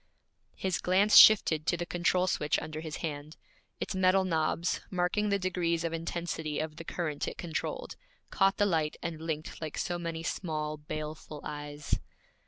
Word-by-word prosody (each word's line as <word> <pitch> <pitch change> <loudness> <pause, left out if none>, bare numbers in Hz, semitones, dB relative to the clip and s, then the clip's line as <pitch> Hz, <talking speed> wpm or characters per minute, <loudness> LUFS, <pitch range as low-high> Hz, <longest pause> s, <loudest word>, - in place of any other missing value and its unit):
His 190 -2 -1
glance 195 +3 +3
shifted 160 -7 +8
to 175 - +2
the 175 - -3
control 175 +1 +1
switch 150 -5 +1
under 155 0 -5
his 160 -2 -5
hand. 150 0 -6 0.4
Its - - -3
metal 185 0 +4
knobs, 165 0 0
marking 185 +3 0
the 200 - +3
degrees 175 -3 0
of 165 -1 -2
intensity 165 -2 -3
of 155 0 -3
the 165 - -6
current 155 -4 -3
it - - -5
controlled, 175 - -4 0.4
caught 195 0 +3
the 205 - +3
light 160 -6 0
and 165 -2 -4
blinked 160 -1 -4
like 155 -2 -5
so 175 0 -2
many 165 -1 -4
small, 155 -3 -3
baleful 150 0 -6
eyes. 145 0 -3
165 Hz, 165 wpm, -30 LUFS, 155-180 Hz, 0.4 s, shifted